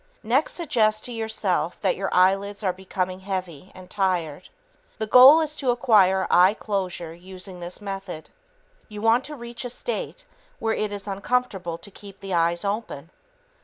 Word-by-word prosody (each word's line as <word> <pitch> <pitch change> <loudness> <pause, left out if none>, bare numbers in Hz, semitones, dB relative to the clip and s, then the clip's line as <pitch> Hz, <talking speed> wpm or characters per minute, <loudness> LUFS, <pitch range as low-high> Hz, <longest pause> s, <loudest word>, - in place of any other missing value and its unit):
Next, 250 +7 +1
suggest 215 -10 0
to 245 - -6
yourself 220 -6 -1
that 190 -3 +1
your 195 +1 -3
eyelids 195 +3 +2
are 185 -2 +1
becoming 185 0 -4
heavy 185 -4 -5
and 185 -1 -12
tired. 180 -7 -2 0.5
The 220 - -2
goal 260 +8 +8
is 305 -1 -3
to 265 - -1
acquire 200 -6 +4
eye 185 +4 +6
closure 185 -6 -4
using 185 +1 -10
this 175 +1 -8
method. 195 -5 -7 0.6
You 210 -1 -8
want 230 +3 +4
to 300 - -7
reach 235 -2 -7
a 245 - -4
state - - -5 0.3
where 225 0 -1
it 215 -1 -2
is 205 0 -6
uncomfortable 195 -4 -2
to 200 - -13
keep 195 0 -13
the 195 -1 -6
eyes 170 +2 +1
open. 200 -7 -4
195 Hz, 165 wpm, -24 LUFS, 185-225 Hz, 0.6 s, goal